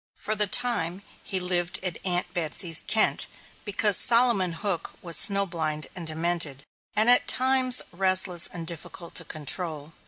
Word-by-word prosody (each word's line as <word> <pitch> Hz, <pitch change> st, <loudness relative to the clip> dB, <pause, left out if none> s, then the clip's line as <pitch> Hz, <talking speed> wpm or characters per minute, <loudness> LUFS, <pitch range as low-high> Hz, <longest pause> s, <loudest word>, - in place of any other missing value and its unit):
For 215 Hz, -, -5 dB
the 210 Hz, -1 st, -1 dB
time, 195 Hz, -6 st, -1 dB, 0.2 s
he 190 Hz, -, -5 dB
lived 180 Hz, -1 st, -3 dB
at 180 Hz, -4 st, -5 dB
Aunt 180 Hz, -1 st, -3 dB
Betsy's 165 Hz, 0 st, 0 dB
tent, 220 Hz, 0 st, +4 dB, 0.4 s
because 205 Hz, 0 st, +3 dB
Solomon 230 Hz, -6 st, +3 dB
Hook 190 Hz, 0 st, -6 dB
was 170 Hz, -2 st, 0 dB
snow 200 Hz, 0 st, +5 dB
blind 155 Hz, -4 st, -6 dB
and 175 Hz, -3 st, -9 dB
demented, 160 Hz, -4 st, -2 dB, 0.3 s
and 215 Hz, +2 st, +2 dB
at 245 Hz, 0 st, +2 dB
times 255 Hz, -1 st, +4 dB
restless 185 Hz, -1 st, +2 dB
and 170 Hz, -2 st, -10 dB
difficult 170 Hz, +1 st, -6 dB
to 165 Hz, -, -4 dB
control. 155 Hz, 0 st, -7 dB
180 Hz, 150 wpm, -23 LUFS, 165-205 Hz, 0.4 s, snow